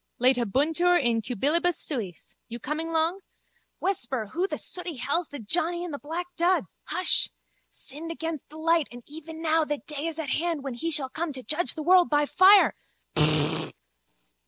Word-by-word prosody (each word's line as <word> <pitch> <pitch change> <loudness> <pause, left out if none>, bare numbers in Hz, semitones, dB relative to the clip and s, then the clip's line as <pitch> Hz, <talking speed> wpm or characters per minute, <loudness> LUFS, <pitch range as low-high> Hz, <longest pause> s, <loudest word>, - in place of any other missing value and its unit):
Laetabuntur 275 - +3
in 235 -4 +1
cubilibus 300 - +1
suis. 220 - -6
You 235 - -5
coming 305 +7 -4
long? 330 +3 +1 0.6
Whisper, 260 - -2
who 360 +4 0
the - - -4
sooty 355 -3 -5
hell's 290 +7 -1
the 290 - -8
johnny 340 +9 0
in 350 - -5
the 285 - -5
black 330 +4 -4
duds? 355 +2 +1
Hush! 365 - +4 0.4
Sinned 310 +5 -8
against 325 -4 -5
the 310 - -12
light 330 -1 +2
and 245 0 -11
even 320 +2 -9
now 320 0 +3
that 295 -1 -4
day 300 +1 -4
is 325 -1 -5
at 315 -4 -4
hand 330 -1 -1
when 270 -2 -4
he 320 +8 -3
shall 290 -5 +1
come 315 +4 -3
to 260 -1 -5
judge 325 +7 0
the 310 - -5
world 360 +1 +5
by 295 0 +3
fire. 385 +6 +6
315 Hz, 170 wpm, -26 LUFS, 275-340 Hz, 0.6 s, fire